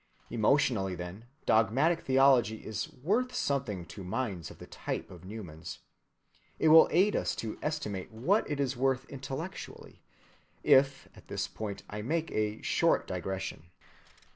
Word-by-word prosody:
Emotionally, 110 -5 +2
then, 90 +6 -7 0.2
dogmatic 130 - +3
theology 130 -5 +4
is 105 -1 -4
worth 220 - 0
something 130 - -1
to 85 +4 -9
minds 95 - -3
of - - -12
the - - -10
type - - -5
of 90 -2 -12
Newman's. 90 -5 -8 0.8
It 160 - +3
will 160 +1 +9
aid 195 +5 +3
us - - 0
to 110 -1 -5
estimate 105 - -3
what 140 - +1
it 145 -1 -2
is 135 -2 0
worth 130 +1 +1
intellectually, 140 +7 -7 0.6
if 135 0 +4
at - - -16
this - - -2
point 105 -2 -6
I 105 0 -5
make 160 +8 -1
a 105 0 -1
short - - +2
digression. 90 -2 -4
120 Hz, 140 wpm, -31 LUFS, 100-140 Hz, 0.8 s, will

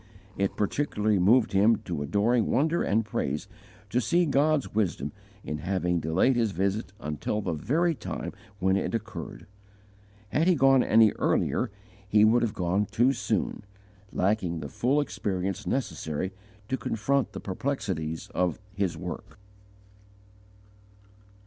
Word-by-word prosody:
It 100 0 -1
particularly 105 -2 0
moved 110 +6 +4
him 105 +4 +5
to 85 -5 -3
adoring 105 - +2
wonder 160 +5 +2
and 110 +2 +1
praise 75 -3 -2 0.4
to 125 - +2
see 170 - +2
God's 145 0 +2
wisdom 95 -9 0 0.3
in 75 - -4
having 90 -1 0
delayed 80 - +2
his 115 -4 +1
visit 100 +3 -1
until 75 +8 -2
the 100 - -2
very 155 - +1
time - - -5 0.2
when 95 0 +2
it 105 - -1
occurred. 110 -7 -6 0.8
Had 155 - +1
he 180 - +5
gone 135 -2 +5
any 110 -1 +5
earlier - - +1 0.4
he 105 0 +6
would 115 +2 +4
have 115 -2 -1
gone 95 +3 0
too 125 +4 +3
soon, 120 - -2 0.5
lacking 90 -4 0
the 75 - -6
full 130 - +1
experience 95 -8 -3
necessary 90 - -2 0.4
to 130 - -1
confront 135 +4 0
the - - -5
perplexities 95 - -3
of 90 -1 0 0.2
his 95 -5 -1
work. 90 0 -7
105 Hz, 135 wpm, -27 LUFS, 90-125 Hz, 0.8 s, he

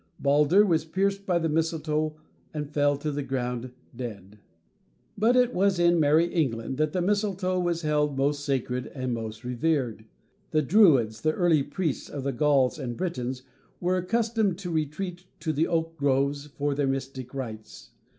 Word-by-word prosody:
Baldur 150 +8 +4
was 165 -5 +2
pierced 195 +4 -1
by 180 -2 +3
the 165 -1 0
mistletoe 155 -1 0 0.4
and 150 -1 -3
fell 145 -1 +2
to 150 +2 -3
the 145 0 -2
ground, 125 -2 -3 0.2
dead. 105 -4 -8 0.8
But 225 +4 +3
it 250 -1 +3
was 195 0 +2
in 175 0 +4
"Merrie 160 +3 +3
England" 130 -6 -1
that 155 -1 +2
the 180 +1 -1
mistletoe 190 -2 0
was 175 -1 -1
held 150 -2 +1
most 145 +1 0
sacred, 130 -3 -2 0.2
most 110 -2 -4
revered. 125 -3 -1 0.4
The 155 -2 +2
Druids, 135 - +4
the 155 0 +2
early 170 -4 +3
priests 145 +1 -3
of 140 -2 -5
the 140 0 -1
Gauls 140 +1 +2
and 120 -4 -4
Britons, 130 -8 -3 0.4
were 180 +1 +1
accustomed 220 0 0
to 185 -3 -5
retreat 175 +4 -3
to 155 -1 -1
the 155 +3 +1
oak 165 -1 -1
groves 140 +1 +1
for 145 0 -2
their 140 0 0
mystic 135 -1 -4
rites. 110 -5 -7
150 Hz, 160 wpm, -27 LUFS, 135-175 Hz, 0.8 s, Baldur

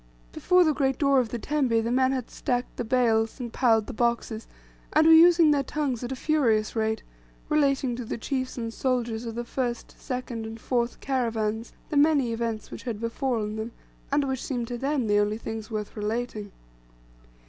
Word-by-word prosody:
Before 360 - +4
the 310 -2 +3
great 270 -3 0
door 275 -2 +4
of 245 -3 0
the 240 - -3
tembe 250 -3 +1
the 230 - -1
men 260 +1 +3
had 255 -3 -3
stacked 245 -2 -2
the - - -1
bales, 225 -1 +1
and 240 -2 -5
piled 225 -4 +3
the 260 - -7
boxes, 235 -1 -1 0.5
and 310 +1 +5
were 325 - +8
using 335 -1 +7
their 285 -1 +3
tongues 275 -4 -2
at 245 - -4
a - - -2
furious 240 -8 +1
rate, 220 0 0 0.5
relating 275 -4 +2
to 250 - -4
the 225 - -4
chiefs 260 +2 -3
and 230 -1 -4
soldiers 240 -3 -1
of 225 - -5
the 240 0 -3
first, 240 -1 -3
second, 250 -4 -4
and 225 +1 -8
fourth 240 0 -1
caravans 230 -4 -1 0.2
the 295 - +1
many 285 -5 +4
events 230 -2 -3
which - - -7
had 230 -5 -4
befallen 230 -2 -2
them, 220 +2 -5 0.4
and 285 +1 +3
which 265 -2 -2
seemed 245 -4 -3
to 245 - -3
them 275 -1 0
the 205 -1 +3
only 205 +1 +1
things 225 -1 -6
worth 215 -2 -4
relating. 215 -1 -3
240 Hz, 190 wpm, -26 LUFS, 225-270 Hz, 0.5 s, were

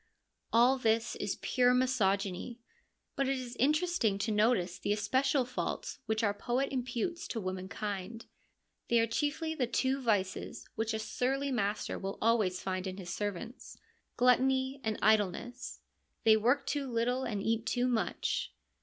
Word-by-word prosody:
All 245 +3 +5
this 225 -1 +1
is - - -2
pure 250 -1 +3
misogyny; 215 -3 0 0.6
but 275 -1 +1
it 270 - +1
is 250 -1 -6
interesting 305 - +2
to 210 +3 -1
notice 210 -4 +2
the - - -1
especial 260 +5 +1
faults 255 - -4
which 220 +1 0
our 205 -2 +2
poet 250 +6 -1
imputes 255 +6 -2
to 230 - -3
womankind. 190 +3 -4 0.6
They 235 - +4
are 230 - +4
chiefly 295 +7 -1
the 260 -6 0
two 265 +3 0
vices 200 -6 -1
which 220 0 -1
a - - 0
surly 265 +5 -1
master 210 -3 -1
will 195 0 -4
always 215 -5 +2
find 185 0 -2
in 185 0 -5
his 180 -2 -6
servants, 205 +5 -5 0.4
gluttony 260 +2 +3
and 220 -2 -1
idleness; 220 +4 +1 0.4
they 220 -1 +7
work 245 +6 +2
too 280 -3 -2
little 245 +3 0
and 205 -5 -2
eat 225 0 0
too 245 0 +1
much. 240 -3 -1
235 Hz, 150 wpm, -32 LUFS, 210-260 Hz, 0.6 s, they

